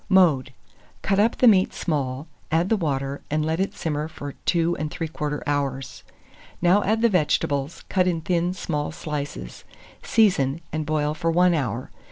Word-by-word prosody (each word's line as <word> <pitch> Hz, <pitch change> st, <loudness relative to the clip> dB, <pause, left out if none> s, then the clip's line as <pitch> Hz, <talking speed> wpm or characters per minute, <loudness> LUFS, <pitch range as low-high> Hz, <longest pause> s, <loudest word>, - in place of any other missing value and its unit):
Mode. 165 Hz, -9 st, +4 dB, 0.5 s
Cut 195 Hz, 0 st, +2 dB
up 225 Hz, +3 st, +3 dB
the 250 Hz, -, +5 dB
meat 190 Hz, -4 st, +4 dB
small, 140 Hz, -4 st, -2 dB, 0.3 s
add 165 Hz, +4 st, +2 dB
the 225 Hz, -, +4 dB
water, 140 Hz, -6 st, -2 dB
and 155 Hz, +1 st, 0 dB
let 160 Hz, +2 st, -1 dB
it 195 Hz, -, -1 dB
simmer 150 Hz, -1 st, -2 dB
for 145 Hz, -3 st, -7 dB
23/4 160 Hz, -3 st, -1 dB
hours. 135 Hz, -3 st, -2 dB, 0.6 s
Now 180 Hz, +4 st, +4 dB
add 220 Hz, +3 st, +1 dB
the -, -, +7 dB
vegetables, 150 Hz, -5 st, 0 dB
cut 185 Hz, -2 st, +2 dB
in 170 Hz, -2 st, 0 dB
thin 175 Hz, +1 st, 0 dB
small 150 Hz, -5 st, -2 dB
slices; 145 Hz, -, -6 dB, 0.4 s
season, 165 Hz, -10 st, +2 dB
and 155 Hz, -1 st, -2 dB
boil 150 Hz, -1 st, 0 dB
for 165 Hz, +2 st, -1 dB
1 175 Hz, +2 st, +4 dB
hour. 130 Hz, -6 st, -2 dB
155 Hz, 155 wpm, -24 LUFS, 145-180 Hz, 0.6 s, the